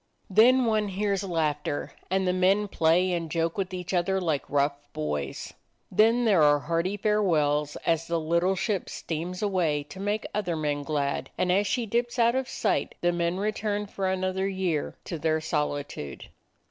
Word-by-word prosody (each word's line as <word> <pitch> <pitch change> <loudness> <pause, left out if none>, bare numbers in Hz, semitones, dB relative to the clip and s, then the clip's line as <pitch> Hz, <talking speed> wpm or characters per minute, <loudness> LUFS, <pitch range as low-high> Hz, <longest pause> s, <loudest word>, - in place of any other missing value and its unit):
Then 245 +6 +6
one 215 -2 +1
hears 200 0 -1
laughter, 150 -5 -1 0.2
and 190 0 +1
the 180 - +2
men 190 +3 +3
play 180 0 +2
and 165 -2 -2
joke 165 +1 -1
with 190 -2 -2
each 180 0 -5
other 185 +2 +1
like 160 -6 -1
rough 140 0 +2 0.2
boys. 75 -2 -4 0.4
Then 230 +3 +4
there 200 -7 +4
are 145 -1 +6
hearty 170 +6 -1
farewells 155 -9 +1
as 165 0 +1
the 170 0 0
little 170 +4 +1
ship 195 0 -1
steams 175 +4 -4
away 170 -8 +1
to 190 - -9
make 205 +2 -1
other 190 -5 -1
men 150 -2 -1
glad, 140 -1 -2
and 180 0 +1
as 200 +3 +2
she 230 +5 0
dips 240 +3 -1
out 235 0 +4
of 265 0 -1
sight - - -1
the 175 - +3
men 170 +1 -1
return 210 0 -1
for 195 -1 -3
an 190 0 -1
other 190 +1 0
year 185 -6 -1
to 170 - -5
their 160 0 +1
solitude. 145 - -3
180 Hz, 175 wpm, -27 LUFS, 155-200 Hz, 0.4 s, Then